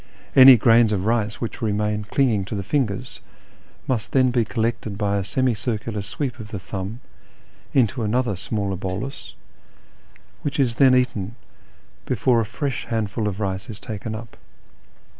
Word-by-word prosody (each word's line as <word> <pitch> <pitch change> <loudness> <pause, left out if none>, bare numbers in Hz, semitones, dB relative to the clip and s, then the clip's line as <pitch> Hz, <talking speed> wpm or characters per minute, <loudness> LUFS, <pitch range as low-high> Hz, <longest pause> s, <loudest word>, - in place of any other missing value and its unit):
Any 130 -1 +10
grains 115 0 +5
of 95 -2 -1
rice 110 -2 0
which 115 - -5
remain 105 -1 -1
clinging 115 -4 +1
to 105 - -5
the 100 - -3
fingers 125 0 -2 0.7
must 120 -5 -2
then 130 -2 +4
be 120 -1 +2
collected 110 -2 -2
by 100 -1 0
a 100 - -1
semi 130 +5 +1
circular 110 -1 -3
sweep 125 +5 -4
of 110 - -7
the 105 - -5
thumb 95 +5 -6 0.7
into 125 -1 +2
another 115 0 0
smaller 100 0 -3
bolus, 95 +9 -5 1.1
which 145 0 -3
is 125 -3 +1
eaten 125 -5 +3 0.7
before 120 -3 +2
a - - -1
fresh 135 +3 -3
handful 110 -2 -1
of 100 0 -3
rice 95 0 -3
is 105 -2 -7
taken 110 -1 -5
up. 115 0 -9
110 Hz, 150 wpm, -23 LUFS, 100-125 Hz, 1.1 s, Any